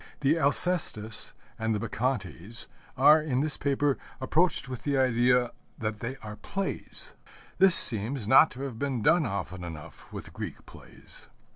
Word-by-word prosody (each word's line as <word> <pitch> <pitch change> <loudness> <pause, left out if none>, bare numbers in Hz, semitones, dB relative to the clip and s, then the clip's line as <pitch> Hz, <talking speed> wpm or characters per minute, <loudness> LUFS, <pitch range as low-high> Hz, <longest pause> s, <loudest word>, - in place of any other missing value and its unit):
The 145 +2 +2
Alcestis 140 - +1 0.3
and 110 0 -1
the - - -3
Bacchantes 115 - -4 0.3
are, 150 +4 +6
in 135 -4 -2
this 150 -1 +2
paper, 140 0 -1 0.2
approached 155 +3 0
with 125 -2 -7
the 140 -2 -1
idea 125 -1 +2 0.3
that 110 -1 -4
they 120 +4 -5
are 105 0 -9
plays. 195 - -6 0.5
This 190 -2 +8
seems 115 +1 +3
not 135 +6 +6
to 130 - -11
have 125 -5 -7
been 135 -5 -3
done 165 0 +3
often 95 -2 -6
enough 80 -3 -11
with - - -10
Greek - - -8
plays. - - -15
130 Hz, 150 wpm, -27 LUFS, 110-145 Hz, 0.5 s, This